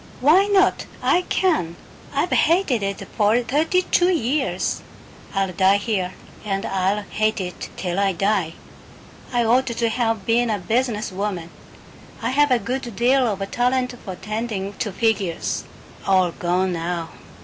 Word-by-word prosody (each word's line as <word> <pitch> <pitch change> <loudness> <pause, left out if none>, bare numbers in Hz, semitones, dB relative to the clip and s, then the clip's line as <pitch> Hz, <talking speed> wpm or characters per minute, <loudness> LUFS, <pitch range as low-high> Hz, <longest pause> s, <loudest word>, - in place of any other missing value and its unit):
"Why 315 +9 +5
not? 390 -2 +3 0.2
I 360 - +3
can! 310 - +1 0.4
I've - - 0
hated 330 - +3
it 195 0 -3
for 215 +2 +3
thirty 315 +8 +1
two 355 0 +3
years. 285 -4 0 0.5
I'll 195 -1 0
die 190 +2 +4
here 200 -4 -2 0.3
and 195 -2 -2
I'll 195 +2 0
hate 215 +1 0
it 180 -2 -5
till 180 0 -2
I 200 -1 +3
die. 190 -2 0 0.8
I 240 -2 +1
ought 250 +4 +3
to 235 -1 0
have 225 -3 -1
been 235 +1 +2
a 215 - +1
business 220 +2 -1
woman. 185 -3 -3 0.7
I - - -1
had 290 +1 +3
a 250 - +5
good 240 +1 -4
deal 250 +3 +3
of 195 0 -4
talent 250 +1 +1
for 190 - -6
tending 215 -1 -4
to 210 - -1
figures. 200 -5 -1 0.4
All 185 -2 +4
gone 180 +2 0
now. 170 0 -3
215 Hz, 150 wpm, -22 LUFS, 190-250 Hz, 0.8 s, Why